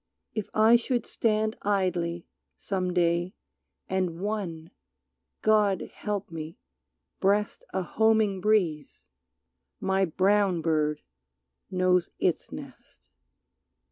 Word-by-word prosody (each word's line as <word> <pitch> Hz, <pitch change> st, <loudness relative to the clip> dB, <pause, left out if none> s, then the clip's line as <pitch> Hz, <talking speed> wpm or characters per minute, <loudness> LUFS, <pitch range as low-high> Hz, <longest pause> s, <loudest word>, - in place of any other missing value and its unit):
If 215 Hz, -3 st, -4 dB
I 220 Hz, +2 st, +6 dB
should 240 Hz, 0 st, -1 dB
stand 215 Hz, -1 st, 0 dB
Idly, 180 Hz, -4 st, 0 dB, 0.3 s
some 185 Hz, -2 st, -2 dB
day, 175 Hz, +1 st, +1 dB, 0.5 s
and 185 Hz, -3 st, -1 dB
one, 185 Hz, -6 st, -4 dB, 0.7 s
God 210 Hz, -3 st, +2 dB
help 205 Hz, -4 st, -4 dB
me! 160 Hz, 0 st, -7 dB, 0.6 s
breast 205 Hz, +2 st, +1 dB
A 190 Hz, -, -1 dB
homing 220 Hz, -1 st, +2 dB
breeze, 165 Hz, -, 0 dB, 0.7 s
my 190 Hz, 0 st, +1 dB
brown 190 Hz, 0 st, +2 dB
bird 150 Hz, -2 st, 0 dB, 0.7 s
knows 185 Hz, -2 st, +2 dB
its -, -, 0 dB
nest. -, -, -12 dB
190 Hz, 95 wpm, -27 LUFS, 170-210 Hz, 0.7 s, I